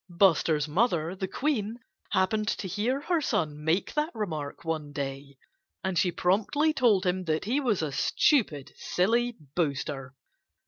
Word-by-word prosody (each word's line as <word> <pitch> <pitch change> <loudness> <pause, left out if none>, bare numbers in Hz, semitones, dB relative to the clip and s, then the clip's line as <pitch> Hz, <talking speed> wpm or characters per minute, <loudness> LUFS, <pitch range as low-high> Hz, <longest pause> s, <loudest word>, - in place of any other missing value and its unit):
Buster's 165 -4 +3
mother, 170 -1 +1
the 190 0 -3
Queen, 230 -2 -1 0.3
happened 210 +2 +1
to 200 - -1
hear 235 +9 -1
her 335 +1 +1
son 150 - -1
make 165 +5 +1
that 300 +1 0
remark 160 -8 -4
one 155 -3 -2
day. 140 -1 -5 0.5
And 190 -1 -1
she 180 +1 +2
promptly 225 - +2
told 230 -9 +3
him 185 0 0
that 160 +1 0
he 250 +7 +1
was 225 - +1
a 150 - -2
stupid, 155 - +1
silly 235 +6 +1 0.2
boaster. 140 -4 -2
185 Hz, 145 wpm, -28 LUFS, 155-230 Hz, 0.5 s, Buster's